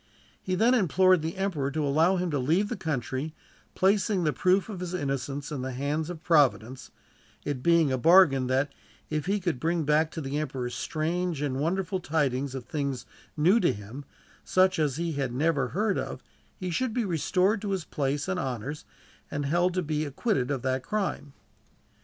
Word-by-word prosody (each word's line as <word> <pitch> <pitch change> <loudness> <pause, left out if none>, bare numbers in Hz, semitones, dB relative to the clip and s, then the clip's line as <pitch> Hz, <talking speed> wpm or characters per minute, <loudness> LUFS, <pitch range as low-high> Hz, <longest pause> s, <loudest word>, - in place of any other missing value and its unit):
He 185 - -2
then 230 +7 +4
implored 185 - +4
the 160 +3 -4
emperor 175 -8 -1
to 150 +1 -1
allow 160 +7 +3
him 180 -2 -1
to 145 - 0
leave 170 +11 +1
the 240 - -2
country, 150 - -3 0.4
placing 195 0 +2
the 150 -2 +1
proof 185 +1 +2
of 205 -5 -6
his 180 0 -4
innocence 140 -2 -3
in 145 -4 -3
the 130 0 -4
hands 145 +5 -2
of 170 -2 -7
Providence; 135 -6 +2 0.6
it 140 -3 -2
being 165 -2 +4
a 130 - 0
bargain 150 -5 +6
that, 135 +3 0 0.4
if 155 +2 -2
he 205 +1 +1
could 175 -9 -2
bring 165 +2 0
back 150 +2 +2
to 160 - -7
the 145 0 -2
emperor 130 -4 -3
strange 165 +2 -2
and 135 -3 -1
wonderful 185 +4 -1
tidings 140 -5 -1
of 130 -3 -6
things 140 -6 -3 0.3
new 180 +9 +5
to 175 - +3
him, 110 +5 -8 0.4
such 185 -2 +3
as 145 -4 +1
he 170 +1 -2
had 140 -4 -2
never 145 -2 +1
heard 205 - 0
of, - - -5 0.3
he 185 -2 -4
should 245 +5 -1
be 240 -3 +1
restored 185 +4 +1
to 210 - -3
his 190 -4 -2
place 145 +1 -2
and 190 -1 -1
honors, 135 +1 -4 0.4
and 145 0 -3
held 175 +5 +1
to 185 - 0
be 155 -1 -1
acquitted 145 - -1
of 135 -4 -2
that 130 0 0
crime. 175 -7 -3
155 Hz, 190 wpm, -27 LUFS, 140-185 Hz, 0.6 s, bargain